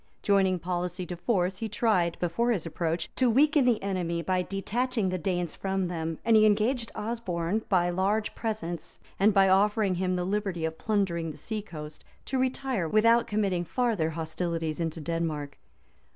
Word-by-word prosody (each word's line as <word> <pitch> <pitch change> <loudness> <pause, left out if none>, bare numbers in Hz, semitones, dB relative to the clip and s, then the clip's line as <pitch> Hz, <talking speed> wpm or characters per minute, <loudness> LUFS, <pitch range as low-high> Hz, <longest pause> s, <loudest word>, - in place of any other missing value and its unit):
Joining 195 -2 +3
policy 180 +1 -3
to 175 - -5
force, 185 0 0
he 225 - -3
tried, 205 -6 +1
before 180 +8 0
his 200 -9 0
approach, 165 0 -2
to 255 -2 +4
weaken 290 +3 +4
the 240 -3 +3
enemy, 175 -4 -1
by 185 0 +1
detaching 210 +3 -1
the 185 0 -2
Danes 175 -1 -1
from 190 -2 -2
them; 165 -2 -3
and 230 - +5
he 215 - +7
engaged 225 +3 +2
Osberne, 210 -4 -2
by 175 -3 +3
large 200 +4 0
presents, 190 -8 -4 0.2
and 205 +3 +5
by 195 -1 +5
offering 200 +1 +3
him 185 0 0
the 180 0 -1
liberty 195 -4 -1
of 160 0 -4
plundering 185 -6 0
the 150 - -8
sea 215 +8 -4
coast, 150 -6 -9 0.2
to 265 - -1
retire 255 -7 -1
without 230 +4 +4
committing 195 -4 0
farther 215 -4 0
hostilities 165 0 -3
into 165 -1 -2
Denmark. 155 -3 -3
185 Hz, 165 wpm, -28 LUFS, 170-215 Hz, 0.2 s, he